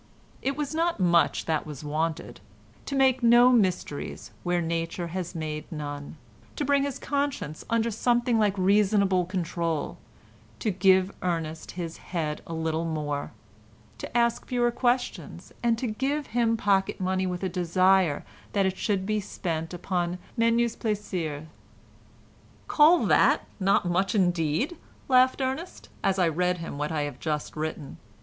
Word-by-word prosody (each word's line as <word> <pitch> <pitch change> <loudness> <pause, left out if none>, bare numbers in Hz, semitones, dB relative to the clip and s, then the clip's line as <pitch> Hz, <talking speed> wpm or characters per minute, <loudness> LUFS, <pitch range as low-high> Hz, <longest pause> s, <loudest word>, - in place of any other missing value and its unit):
It 275 +1 -1
was 295 0 -2
not 335 -2 0
much 175 -2 +3
that 160 -2 -1
was 150 -1 -8
wanted. 155 +2 -3 0.5
To 280 - -2
make 265 -1 +3
no 240 +1 +7
mysteries 180 - -1
where 175 0 0
Nature 165 +1 -2
has 180 0 -5
made 155 -1 -5
none, 145 -1 -6 0.4
to 290 - -2
bring 280 0 +3
his 280 -1 -2
conscience 280 - -2
under 230 0 +1
something 240 +1 +2
like 205 -2 +2
reasonable 195 -1 +3
control, 170 -4 -2 0.6
to 220 - -1
give 190 0 +4
Ernest 165 -3 -3
his 170 -2 -5
head 155 -4 -3
a 165 - -5
little 160 0 -1
more, 150 -3 -3 0.7
to - - -3
ask 235 -1 +1
fewer 240 -1 +1
questions, 245 +1 -2
and 235 -1 +2
to 255 - -3
give 270 +6 -1
him 230 -1 +2
pocket 195 -2 +1
money 185 0 0
with 180 +1 -4
a - - +1
desire 185 -2 +2 0.3
that 200 -2 +2
it 190 0 -1
should 195 -4 0
be 215 +1 0
spent 165 -5 -4
upon 175 0 -2 0.2
menus 230 0 +2
plaisirs... 180 -9 -3 1.2
"Call 320 +4 +5
that - - +4
not 195 0 +2
much 185 +4 +1
indeed," 175 - +1 0.3
laughed 255 +1 +4
Ernest, 265 +7 -4
as 195 -1 +2
I 180 -2 +3
read 180 +3 +1
him 165 -4 -6
what 150 +1 -2
I 155 -2 0
have 145 -3 -6
just 150 -2 -3
written. 155 -2 -5
185 Hz, 150 wpm, -27 LUFS, 165-235 Hz, 1.2 s, no